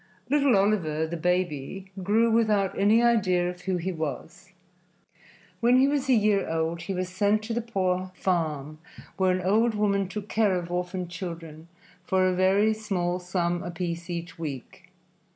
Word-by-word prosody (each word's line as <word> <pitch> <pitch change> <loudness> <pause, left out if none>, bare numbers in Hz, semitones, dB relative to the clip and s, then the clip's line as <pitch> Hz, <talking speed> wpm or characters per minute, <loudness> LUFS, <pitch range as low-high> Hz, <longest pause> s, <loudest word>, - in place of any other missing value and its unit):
Little 280 -6 +4
Oliver, 175 -6 +1
the 165 +2 -5
baby, 180 +1 -2
grew 220 +5 +2
without 215 -4 +2
any 215 +4 +4
idea 190 -7 +3
of 180 0 -6
who 185 0 -1
he 180 +2 -2
was. 165 +2 -6 1.1
When 245 +1 +4
he 265 +1 +5
was 280 -1 -1
a - - +6
year 210 -3 +2
old 165 +1 -1
he 180 +3 -4
was 185 0 -2
sent 205 +3 +1
to 225 +1 -4
the 235 - -1
poor 185 -5 -1
farm 155 -5 -2 0.4
where 190 -1 +2
an 185 0 +1
old 220 +4 +2
woman 200 -2 +1
took 205 +2 -6
care 210 -4 +2
of 175 -1 -4
orphan 180 0 -3
children 170 -3 -8 0.4
for 185 +1 +2
a 185 - +2
very 195 +4 +3
small 185 -5 -2
sum 175 -1 -1
apiece 170 0 -5
each 170 0 -6
week. 140 -7 -7
185 Hz, 165 wpm, -26 LUFS, 170-210 Hz, 1.1 s, a